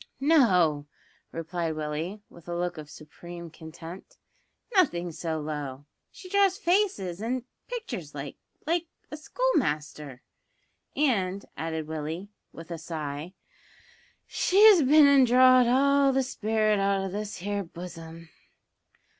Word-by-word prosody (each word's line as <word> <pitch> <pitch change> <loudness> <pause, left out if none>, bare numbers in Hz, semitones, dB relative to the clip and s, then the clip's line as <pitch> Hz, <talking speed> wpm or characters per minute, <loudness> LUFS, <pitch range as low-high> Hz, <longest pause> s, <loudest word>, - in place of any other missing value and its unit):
"No!" 180 - +3 0.4
replied 165 0 -3
Willie, 155 +7 -4
with 170 0 -17
a 175 - -3
look 175 -1 -3
of 150 -1 -10
supreme 170 +3 -11
contempt; 165 - -11 0.6
"nothin' 175 - +2
so 160 0 -4
low; 145 -2 -5 0.2
she 370 - -13
draws 390 0 +2
faces 340 - 0
an' 245 +2 -2 0.2
pictures 445 - -6
like 140 0 -6 0.3
like 340 +2 0 0.2
a 300 - -6
schoolmaster, 150 - -2 0.7
and," 200 -9 0
added 160 -1 -4
Willie, 160 +5 -5 0.2
with 165 +1 -11
a 170 - -5
sigh, 155 +1 -6 0.9
"she's 405 -1 +5
bin 295 +2 +6
an' 280 -1 +6
drawed 255 0 +6
all 275 +2 +4
the 265 0 +1
spirit 215 -4 0
out 195 0 +1
o' - - -2
this 210 +2 -5
here 200 +2 -3
buzzum." 165 -1 -10
180 Hz, 120 wpm, -27 LUFS, 160-265 Hz, 0.9 s, bin